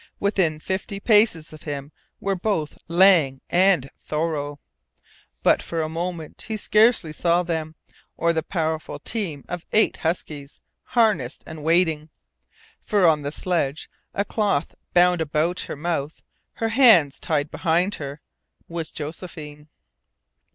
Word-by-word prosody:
Within 185 -6 +1
fifty 190 +4 -4
paces 205 -8 +3
of 155 - -12
him 145 -1 -6 0.3
were 195 - -1
both 180 -5 -2
Lang 170 -6 +5
and 180 -6 +4
Thoreau. 150 -2 -2 0.9
But - - +4
for 165 - -4
a 155 - -3
moment 165 -1 -5
he 220 -2 -3
scarcely 215 -6 +3
saw 170 +2 +2
them, 160 -2 -3 0.4
or 170 0 +2
the 160 - 0
powerful 160 -2 -3
team 180 - -4
of 175 -1 -5
eight 220 - +3
huskies, 150 -4 -4 0.2
harnessed 210 - +1
and 160 -1 -9
waiting. 160 -2 +2 0.7
For 205 -3 +2
on 155 -3 +4
the 145 0 -3
sledge, 155 -4 -2 0.2
a 200 - 0
cloth 200 -10 0 0.2
bound 180 -1 +5
about 160 +3 0
her - - -3
mouth, 155 -1 -3 0.3
her 225 - -2
hands 220 - +5
tied 150 -1 -1
behind 175 +4 +1
her, 140 +1 -6 0.5
was 165 -2 -5
Josephine! 150 -1 -8
165 Hz, 130 wpm, -23 LUFS, 150-185 Hz, 0.9 s, Lang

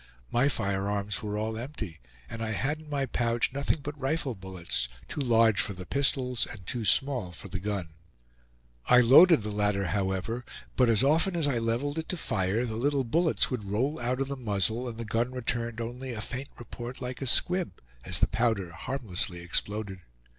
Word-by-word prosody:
My 125 +4 +3
firearms 100 -3 -1
were 105 -1 -3
all 110 +1 -2
empty, 115 - -6 0.3
and 115 - -7
I 110 -1 -1
had 150 +8 -1
in 155 - -14
my 140 -2 0
pouch 120 0 0
nothing 140 +2 0
but 145 +1 -4
rifle 140 0 -1
bullets, 95 - -3 0.2
too 150 - -4
large 115 -4 +4
for 100 - -2
the 90 0 -8
pistols 130 -2 0
and 95 -3 -10
too 120 +4 -3
small 125 -5 +2
for 90 +3 -10
the 95 +1 -3
gun. 100 -4 -3 1.0
I 125 - +7
loaded 135 - +8
the 105 - -3
latter, 105 -1 +1
however, 95 +4 -1 0.3
but 125 -2 +4
as 115 +1 +4
often 165 +6 +3
as 160 -4 +1
I 130 -4 +1
leveled 120 +7 -1
it 160 - -6
to 180 - -1
fire, 105 - 0
the 110 -2 -4
little 140 +2 +1
bullets 160 +7 +2
would 120 -5 -3
roll 125 +10 0
out 125 +2 -1
of 135 - 0
the 140 - -3
muzzle 110 +1 0
and 115 - -8
the 115 - -5
gun 115 +4 0
returned 120 -2 -2
only 120 +2 -5
a 110 - -5
faint 130 +5 -5
report 120 +1 -7
like 125 +1 -5
a 135 - -1
squib, 180 +8 +1 0.2
as - - -1
the - - +5
powder 110 -7 0
harmlessly 95 -5 -3
exploded. 100 +2 -2
115 Hz, 190 wpm, -29 LUFS, 105-135 Hz, 1.0 s, loaded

